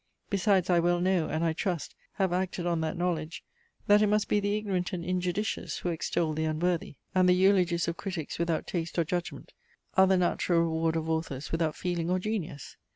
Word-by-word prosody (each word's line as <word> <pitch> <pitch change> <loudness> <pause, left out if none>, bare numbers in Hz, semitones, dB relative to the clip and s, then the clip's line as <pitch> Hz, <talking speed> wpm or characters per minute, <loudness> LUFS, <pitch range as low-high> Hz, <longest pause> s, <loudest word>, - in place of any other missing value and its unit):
Besides 195 -2 +2
I 175 - +5
well 175 +1 +2
know, 180 -2 +1
and, 160 +1 -1
I 165 -1 +2
trust, 175 -1 -3 0.2
have 190 -3 0
acted 180 -1 -1
on 170 -2 0
that 160 +2 -2
knowledge, 170 -2 -2 0.4
that 205 0 +5
it 210 - +4
must 210 0 +2
be 210 - +2
the 205 +1 0
ignorant 190 -4 -2
and 170 -2 -3
injudicious 180 +3 -2
who 180 - -3
extol 165 -1 -1
the 160 +1 -1
unworthy; 160 0 -1 0.2
and 185 -1 +4
the 180 - +6
eulogies 180 -3 +3
of 170 0 -2
critics 185 -7 -5
without 170 -1 0
taste 170 -1 -4
or 170 - +4
judgment 175 +2 -4 0.4
are 190 0 +6
the 190 0 +4
natural 175 -1 +2
reward 160 0 0
of 160 0 -2
authors 160 -4 -3
without 165 -2 0
feeling 175 -2 -2
or 185 - +2
genius. 185 - -4
175 Hz, 200 wpm, -29 LUFS, 165-185 Hz, 0.4 s, the